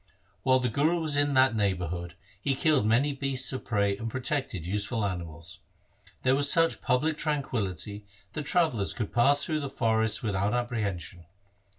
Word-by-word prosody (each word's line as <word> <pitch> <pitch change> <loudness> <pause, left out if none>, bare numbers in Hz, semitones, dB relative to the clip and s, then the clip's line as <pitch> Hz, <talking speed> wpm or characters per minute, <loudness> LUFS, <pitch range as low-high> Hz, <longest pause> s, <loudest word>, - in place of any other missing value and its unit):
While 130 +5 +4
the 125 -1 0
Guru 155 +8 +1
was 155 -3 -1
in 145 -1 +2
that 130 -2 +4
neighbourhood 90 -4 -2 0.3
he 135 +3 0
killed 145 -6 +2
many 130 +6 +2
beasts 135 -2 -2
of 130 - -5
prey 100 -3 0
and 115 +3 -5
protected 130 - -3
useful 105 +4 -1
animals. 85 -2 -6 0.6
There 130 - +3
was 140 +1 +4
such 165 -1 +4
public 150 +5 0
tranquillity 105 - -3 0.3
that 150 -2 -5
travellers 155 - +1
could 110 -5 -5
pass 140 +4 +3
through 155 -2 -1
the 140 -2 -4
forests 110 -3 0
without 100 +1 0
ap 120 0 -1
prehension. 95 -7 -4
120 Hz, 165 wpm, -28 LUFS, 100-140 Hz, 0.6 s, While